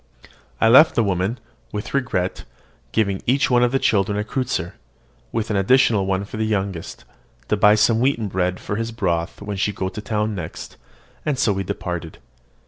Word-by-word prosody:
I - - +4
left 135 +8 +7
the 115 - +3
woman, 100 +4 -1 0.3
with 105 0 -5
regret, 105 -9 -1 0.5
giving 100 - 0
each 135 +2 +2
of 120 0 +4
the 135 - +2
children 100 -4 +1
a 105 - 0
kreutzer, 115 - -2 0.6
with 115 -1 -2
an 105 - +1
additional 105 -1 +3
one 95 +1 0
for 105 - -8
the 110 - 0
youngest, 100 -5 -3 0.4
to - - +3
buy 105 0 +5
some 110 +1 +3
wheaten 120 -4 +1
bread 90 -1 -1
for 100 - -4
his 115 0 -3
broth 90 -5 -2
when 105 -1 -4
she 100 +2 +1
went 95 -2 -4
to 105 - -5
town 105 0 -1
next; 90 -5 -7 0.5
and 150 -3 -1
so 110 -5 +2
we 95 0 -2
parted. 85 -2 -5
105 Hz, 180 wpm, -21 LUFS, 95-115 Hz, 0.6 s, left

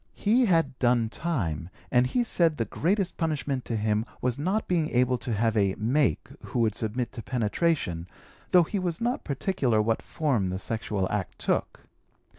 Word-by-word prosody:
He 235 +4 +3
had 165 -8 +2
'done 120 -2 +3
time' 95 - -2 0.2
and 125 0 +4
he 245 - +1
said 170 -8 +2
the 115 - 0
greatest 185 - 0
punishment 145 -5 -1
to 115 - -2
him 105 0 +1 0.2
was 125 +1 -1
not 190 +8 0
being 165 -3 +1
able 125 0 +2
to 125 - -4
have 110 +1 +1
a 100 -3 +2
'make' 120 - +1 0.2
who - - -3
would 110 -2 +2
submit 115 +3 -2
to 120 - -7
penetration, 115 - -1 0.4
though 180 -1 +6
he 200 +5 -2
was 175 -3 -2
not 245 +5 -1
particular 135 - 0
what 110 +1 +1
form 135 - 0
the 90 0 -2
sexual 105 -1 -2
act 105 -4 -3
took. - - -1
125 Hz, 175 wpm, -27 LUFS, 110-165 Hz, 0.4 s, though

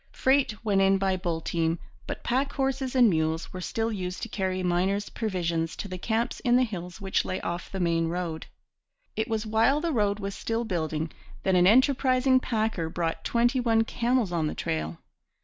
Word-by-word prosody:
Freight 260 -5 +1
went 200 -2 +3
in 195 0 +4
by 190 -1 +1
bull 175 -3 -2
team, 165 0 0 0.3
but - - -5
pack 265 +4 0
horses 270 -1 -1
and 250 -2 +7
mules 160 -3 0
were 185 - -5
still 225 +4 -1
used 185 -3 -4
to - - -2
carry 185 -2 -2
miners' 185 +3 0
provisions 170 -6 -2
to - - -5
the 185 -1 -6
camps 225 +4 -1
in 245 -1 +2
the 255 - +5
hills 180 -6 -5
which 195 -1 0
lay 185 - -3
off 175 +1 -4
the 195 - -4
main 165 -2 +1
road. 170 -2 -3 0.7
It 220 - -1
was 220 -1 -2
while 225 +7 +3
the 330 0 -1
road 205 -4 +1
was 200 -1 -4
still 230 +3 -2
building 160 -5 -2 0.3
that 190 - +2
an 180 0 +5
enterprising 260 +2 +4
packer 220 -9 -1
brought 165 0 -2
twenty 240 +2 +2
one 225 -2 +3
camels 235 -3 0
on 165 -3 0
the - - -4
trail. 80 +1 -3
195 Hz, 190 wpm, -27 LUFS, 175-235 Hz, 0.7 s, and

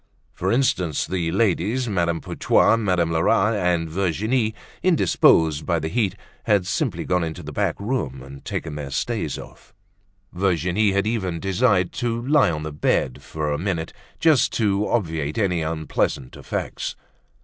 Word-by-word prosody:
For 95 +2 -1
instance, 95 - +1
the 85 -3 -2
ladies, 110 +5 +1
Madame 85 -5 0
Putois, - - +3
Madame 90 -7 +1
Lerat, 95 +6 +3
and 90 -5 +1
Virginie, 105 +7 0 0.3
indisposed 80 - +3
by 85 -2 +2
the 80 0 -2
heat, 100 -2 0 0.3
had 105 -5 +3
simply - - -1
gone 90 -1 +1
into 80 +2 -5
the 75 - -7
back - - -1
room 100 - -3
and 70 0 -11
taken 80 - -4
their 75 -2 -5
stays 85 - -2
off; - - -13 0.6
Virginie 90 +2 +1
had 100 +1 +1
even 95 -7 -1
desired 95 0 +2
to 120 -2 -2
lie 145 - +4
on 75 -2 -3
the 75 - -4
bed 70 -3 0
for 75 -1 -3
a 75 - -1
minute, 85 -3 -2 0.3
just 155 -5 +4
to 105 -2 +1
obviate 80 -8 -1
any 90 -6 +1
unpleasant 80 -4 -2
effects. - - -4
90 Hz, 150 wpm, -23 LUFS, 80-110 Hz, 0.6 s, lie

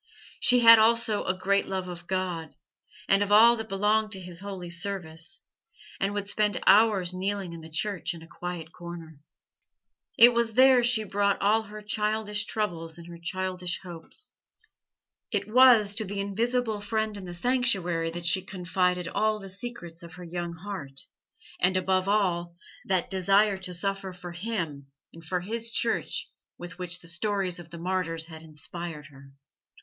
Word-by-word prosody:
She 250 -1 +5
had 230 -1 +10
also 225 -1 +3
a 185 - 0
great 200 +2 +1
love 190 -1 -3
of 175 -1 -8
God 180 -4 -3 0.5
and 195 +1 +4
of 205 0 0
all 230 +3 +8
that 220 0 -6
belonged 210 +2 +1
to 190 - -6
His 180 -2 -9
holy 190 -3 -7
service, 175 +1 -4 0.5
and 195 - 0
would 205 -1 -3
spend 210 -1 +1
hours 200 -4 +5
kneeling 190 -1 -3
in 165 - -8
the 160 - -11
church 180 +2 -1
in 165 - -11
a - - -13
quiet 170 -2 -7
corner. 170 -3 -9 1.0
It 240 +1 +9
was 235 -1 0
there 260 0 +6
she 235 -2 +3
brought 200 -1 0
all 215 +3 +3
her 215 0 -10
childish 210 0 -1
troubles 170 -6 -3
and 170 - -11
her 170 -1 -10
childish 180 0 -2
hopes; 175 - -6 1.0
it - - -1
was 230 -3 +6
to 220 +2 -1
the 200 0 -5
invisible 220 +2 -1
Friend 220 +1 -2
in 200 -2 -8
the 175 -1 -7
sanctuary 185 -7 +1
that 170 +1 -6
she 185 +3 +3
confided 180 -1 -1
all 215 +4 +1
the 195 -1 -9
secrets 185 -5 -6
of 170 -1 -11
her 180 - -10
young 175 0 -4
heart, 160 -7 -7 0.6
and, 185 +1 +3
above 185 0 +1
all, 175 -4 +1 0.3
that 185 -1 0
desire 195 +1 +3
to 185 -1 -4
suffer 195 +1 -3
for 180 -1 -9
Him 170 -7 -4 0.3
and 165 - -13
for 180 +2 -2
His 230 +4 -3
Church 230 0 -1 0.3
with 175 +1 -10
which 175 -1 -5
the 170 - -12
stories 185 +1 -1
of 170 -1 -11
the 170 - -9
martyrs 170 -2 -2
had 160 -1 -11
inspired 160 0 -7
her. 135 -1 -16
190 Hz, 170 wpm, -27 LUFS, 170-210 Hz, 1.0 s, had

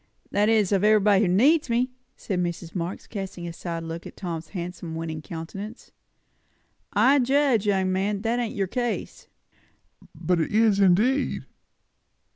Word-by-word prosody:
"That 205 +1 +2
is, 215 -4 +3
of 200 -1 +2
everybody 210 -2 +5
who - - +2
needs 270 - +4
me," 245 +2 +1 0.3
said 190 -4 -3
Mrs. 170 -1 -4
Marx, 175 0 -4
casting 190 -4 -6
a 170 - -6
side 165 -1 -5
look 165 +1 -6
at - - -13
Tom's 165 -3 -5
handsome, 175 -3 -6
winning 160 -1 -4
countenance. 195 +8 -8 1.0
"I 280 +2 +4
judge, 260 -4 +2
young 190 -2 +2
man, 195 +2 -1
that 235 +2 0
ain't 235 -2 -3
your 195 - 0
case." 240 +5 -3 0.9
"But 180 -1 0
it - - -2
is, 215 -1 +3
indeed!" 210 +9 +2
195 Hz, 150 wpm, -25 LUFS, 175-225 Hz, 1.0 s, everybody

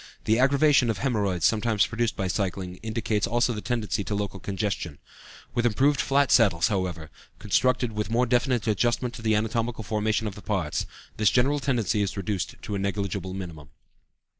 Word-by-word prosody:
The 110 +2 +2
aggravation 140 -1 +4
of 110 - 0
hæmorrhoids 100 - 0
sometimes 110 0 +3
produced 115 -1 -1
by 95 -3 -2
cycling 90 -1 -2
indicates 110 0 -1
also 120 +1 +1
the 105 - -5
tendency 110 -4 -1
to 100 - -2
local 100 -1 -3
congestion. 95 -6 -3 0.6
With 120 - +1
the 120 - +3
improved 135 +5 +2
flat 140 0 +2
saddles, 95 -6 +4
however, 90 -6 -3 0.3
constructed 125 -1 +1
with 105 -2 -3
more 120 +2 +2
definite 125 0 +1
adjustment 120 +3 0
to 125 - -8
the 110 -1 +2
anatomical 115 +1 -1
formation 110 +1 0
of 105 - -3
the 105 - -11
parts, 95 -9 -2 0.3
this 110 -2 +4
general 135 +4 +2
tendency 115 -7 0
is 100 0 -2
reduced 100 -1 -3
to 105 - -5
a 100 - -1
negligible 100 -1 -3
minimum. 80 -6 -8
110 Hz, 175 wpm, -26 LUFS, 100-120 Hz, 0.6 s, aggravation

